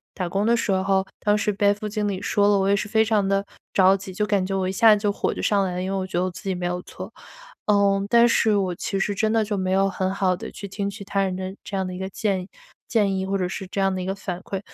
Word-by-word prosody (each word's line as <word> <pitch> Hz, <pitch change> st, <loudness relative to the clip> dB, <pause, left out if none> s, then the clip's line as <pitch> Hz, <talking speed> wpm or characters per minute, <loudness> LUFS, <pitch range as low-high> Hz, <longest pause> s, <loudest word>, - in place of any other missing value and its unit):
打 180 Hz, -2 st, -2 dB
工 195 Hz, +4 st, -1 dB
的 235 Hz, +1 st, +3 dB
时 210 Hz, -, -1 dB
候 190 Hz, 0 st, +1 dB
当 210 Hz, 0 st, +2 dB
时 215 Hz, 0 st, 0 dB
被 200 Hz, 0 st, +3 dB
副 210 Hz, +1 st, -6 dB
经 210 Hz, 0 st, -2 dB
理 190 Hz, -2 st, -2 dB
说 205 Hz, 0 st, +2 dB
了， 205 Hz, -1 st, +4 dB
我 195 Hz, -, +1 dB
也 200 Hz, -, +4 dB
是 205 Hz, +1 st, -2 dB
非 220 Hz, 0 st, +3 dB
常 215 Hz, -2 st, +2 dB
的 195 Hz, 0 st, +1 dB, 0.3 s
着 190 Hz, 0 st, +5 dB
急 190 Hz, 0 st, -7 dB
就 210 Hz, +3 st, 0 dB
感 200 Hz, -2 st, +1 dB
觉 195 Hz, 0 st, -2 dB
我 185 Hz, -1 st, 0 dB
一 -, -, -1 dB
下 215 Hz, +2 st, +6 dB
子 205 Hz, -, -5 dB
就 205 Hz, -, +2 dB
火 -, -, -1 dB
就 -, -, -8 dB
上 200 Hz, -2 st, +2 dB
来 180 Hz, -, -3 dB
了， 180 Hz, -, -2 dB
因 190 Hz, -, -3 dB
为 -, -, -1 dB
我 190 Hz, 0 st, -3 dB
觉 175 Hz, -, -3 dB
得 180 Hz, -, +2 dB
我 185 Hz, -, -2 dB
自 180 Hz, -, -11 dB
己 185 Hz, -, 0 dB
没 175 Hz, 0 st, -4 dB
有 180 Hz, 0 st, -2 dB
错。 -, -, -10 dB, 0.5 s
呃， 200 Hz, -1 st, +3 dB
但 235 Hz, 0 st, +6 dB
是 220 Hz, -2 st, +3 dB
我 185 Hz, -2 st, 0 dB
其 195 Hz, +3 st, -3 dB
实 205 Hz, +1 st, 0 dB
真 215 Hz, +2 st, 0 dB
的 225 Hz, -1 st, +2 dB
就 205 Hz, -1 st, -2 dB
没 185 Hz, -1 st, -1 dB
有 195 Hz, +1 st, +3 dB
很 190 Hz, -1 st, -1 dB
好 190 Hz, -2 st, +1 dB
的 -, -, -7 dB
去 200 Hz, -, -8 dB
听 200 Hz, +1 st, -3 dB
取 200 Hz, 0 st, -8 dB
他 195 Hz, 0 st, -1 dB
人 185 Hz, -1 st, -1 dB
的 190 Hz, +1 st, -5 dB
这 195 Hz, -, -4 dB
样 190 Hz, -, -1 dB
的 185 Hz, -, -5 dB
一 180 Hz, -, -7 dB
个 190 Hz, 0 st, -4 dB
建 195 Hz, -2 st, -1 dB
议 180 Hz, -, -11 dB, 0.4 s
建 205 Hz, -4 st, +1 dB
议， 190 Hz, -, -1 dB
或 195 Hz, 0 st, 0 dB
者 180 Hz, -1 st, -1 dB
是 190 Hz, +1 st, -6 dB
这 195 Hz, -, -4 dB
样 195 Hz, 0 st, +2 dB
的 185 Hz, -, -3 dB
一 -, -, -4 dB
个 195 Hz, -, -2 dB
反 185 Hz, -2 st, -5 dB
馈。 195 Hz, -1 st, -4 dB
195 Hz, 340 characters per minute, -23 LUFS, 190-205 Hz, 0.5 s, 下